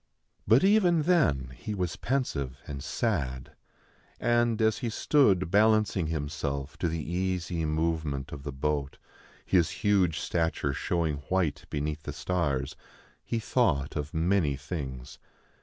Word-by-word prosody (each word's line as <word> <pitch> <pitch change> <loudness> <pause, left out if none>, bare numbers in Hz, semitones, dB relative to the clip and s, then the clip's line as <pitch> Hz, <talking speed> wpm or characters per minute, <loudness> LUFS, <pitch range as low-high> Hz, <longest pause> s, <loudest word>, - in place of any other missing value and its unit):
But 115 +8 +5
even 190 -5 +4
then 105 - +2
he 105 - -5
was 90 -4 -2
pensive 70 - -2
and 70 -2 -6
sad; 70 - -2 0.7
and, 120 -2 +2
as 110 -1 +2
he 120 - -2
stood 105 - +3
balancing 105 -4 +3
himself 70 -2 -3
to 85 - 0
the 80 -2 -3
easy 90 -2 -1
movement 80 -3 -1
of 70 - -7
the 70 +1 -5
boat, 70 0 -2 0.5
his 85 -4 +3 0.2
huge 95 -6 +3
stature 80 -4 -1
showing 80 0 -1
white 80 -7 0
beneath 75 +1 -3
the - - -6
stars, 70 -7 -1 0.5
he 115 - -2
thought 90 - +1
of 75 -1 -3
many 85 -3 +1
things. 65 -4 -6
80 Hz, 130 wpm, -28 LUFS, 70-105 Hz, 0.7 s, But